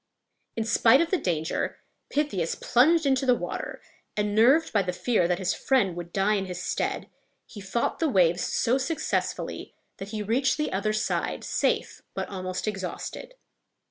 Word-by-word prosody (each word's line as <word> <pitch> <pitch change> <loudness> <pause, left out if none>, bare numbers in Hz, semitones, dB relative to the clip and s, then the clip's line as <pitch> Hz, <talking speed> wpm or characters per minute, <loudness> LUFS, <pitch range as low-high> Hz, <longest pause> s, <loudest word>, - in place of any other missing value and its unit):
In 225 - -1
spite 225 +3 +5
of 335 0 +1
the 375 - +2
danger, 160 -3 -2 0.3
Pythias 240 - -1
plunged 315 +6 +3
into 270 -1 +2
the 250 - +6
water, - - -5 0.3
and, 210 0 0
nerved 255 +9 +4
by 205 - +4
the 180 -1 -2
fear 210 -3 +1
that 180 0 +1
his 185 -1 0
friend 235 -10 +1
would 175 -1 -7
die 195 +3 +2
in 195 -2 -1
his 180 -1 -5
stead, 180 - -2 0.4
he 205 - -11
fought 195 +5 -1
the 325 - +2
waves 175 -6 +3
so 250 +4 +1
successfully 285 +5 -2 0.2
that 195 - -7
he 215 -1 -3
reached 250 +6 +1
the 300 - -1
other 200 +3 0
side 215 - -1
safe - - -1
but - - -3
almost 185 0 -4
exhausted. 200 - -5
210 Hz, 170 wpm, -26 LUFS, 185-260 Hz, 0.4 s, the